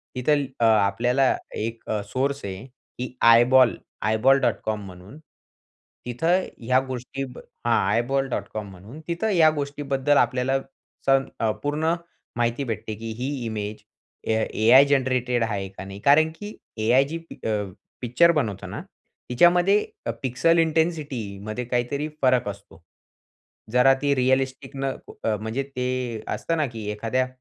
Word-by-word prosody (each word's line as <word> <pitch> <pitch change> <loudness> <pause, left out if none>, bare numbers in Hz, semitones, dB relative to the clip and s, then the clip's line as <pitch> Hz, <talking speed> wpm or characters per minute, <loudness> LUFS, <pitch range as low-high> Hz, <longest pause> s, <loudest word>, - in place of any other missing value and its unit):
तिथं 145 +3 +2 0.2
अ, 115 - +3
आपल्याला 115 +5 +3 0.2
एक 115 +1 -5 0.2
सोर्स 140 +4 -1
आहे 95 +2 -6
की 125 -1 -10
आयबॉल, 120 +2 +6 0.3
eyeball.com 110 -1 +2
म्हणून. 95 +7 -12 0.9
तिथं 165 +10 +1 0.2
ह्या 125 +2 +2
गोष्टीब 130 +1 -6 0.3
हा, 120 - +3 0.2
eyeball.com 120 -4 -1
म्हणून 100 - -12
तिथं 170 +6 -1
या 170 -6 +5
गोष्टीबद्दल 140 0 0
अ, - - +7
आपल्याला 130 +1 0 0.5
स - - +3 0.3
अ, 110 -1 +2
पूर्ण 155 +3 0 0.4
माहिती 120 +3 0
भेटते 110 -3 -4
की 115 +2 -6
ही 130 +2 -2 0.2
इमेज 105 -1 -5 0.5
A-I 110 +3 +5
जनरेटेड 125 -3 +1
आहे 100 -4 -2
का 95 0 -10
नाही 100 +1 -9
कारण 155 +3 +6
की 205 +5 -8 0.3
A-I 120 +5 +4
जी 165 - -3 0.3
अ, 110 - 0 0.5
पिक्चर 130 +8 +4
बनवतो 115 - -2
ना, - - -6 0.5
तिच्यामध्ये 175 +10 +4 0.4
पिक्सल 165 +7 +2
इंटेंसिटीमध्ये 140 - -1
काहीतरी 125 +5 -1
फरक 130 -4 +3
असतो. 100 -3 -11 0.9
जरा 125 +2 +5
ती 145 -1 +2
रियलिस्टिक 130 +1 0
न 135 0 -3 0.4
अ, 110 - +1
म्हणजे 110 +6 -3
ते 125 -2 -2
असतं 165 - -2
ना 155 - +2
की 110 -2 -6
एखाद्या 115 +5 -1
125 Hz, 130 wpm, -24 LUFS, 110-140 Hz, 0.9 s, अ